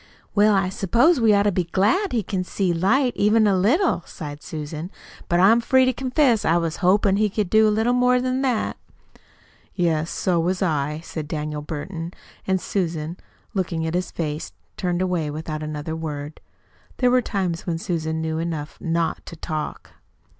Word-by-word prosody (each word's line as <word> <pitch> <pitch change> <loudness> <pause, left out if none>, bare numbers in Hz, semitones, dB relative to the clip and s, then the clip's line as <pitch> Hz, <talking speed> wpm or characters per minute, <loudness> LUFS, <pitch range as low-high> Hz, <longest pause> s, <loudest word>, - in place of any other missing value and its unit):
"Well, 210 0 +4
I 190 -1 +1
s'pose 235 - +3
we 225 -1 +5
ought 200 - +4
to 205 - +2
be 180 -2 0
glad 210 - +1
he 230 -4 0
can 190 -1 -2
see 180 -1 -1
light 240 +9 +2
even 215 +2 +4
a 200 -2 +3
little," 245 - +2
sighed 145 -1 -8
Susan; 155 +2 -6 0.4
"but 175 - +3
I'm 220 +6 +6
free 260 +2 +4
to 255 - +2
confess 255 -2 +2
I 165 - +3
was 165 -2 -1
hopin' 195 +1 +3
he 215 0 +2
could 200 -2 -2
do 220 0 +6
a - - +4
little 220 +3 +2
more 250 0 +3
than 255 +1 -1
that." 255 -5 0 1.0
"Yes, 165 -3 +1
so 180 -2 0
was 180 +2 0
I," 150 -2 -1
said 155 -2 -6
Daniel 150 -1 -3
Burton. 165 +3 -6 0.3
And 190 0 +2
Susan, 165 -4 -2 0.4
looking 170 -4 -1
at 160 - -2
his 180 +1 -1
face, 155 -2 -4 0.2
turned 180 -1 -1
away 175 -5 -1
without 155 +1 -5
another 155 +1 -4
word. 150 -2 -6 0.6
There 250 -1 +3
were 250 0 +4
times 185 -7 -2
when 165 -2 0
Susan 160 -2 -2
knew 160 0 -2
enough 160 -3 -4
not 165 -1 -1
to - - -8
talk. 155 -1 -5
180 Hz, 180 wpm, -23 LUFS, 160-215 Hz, 1.0 s, I'm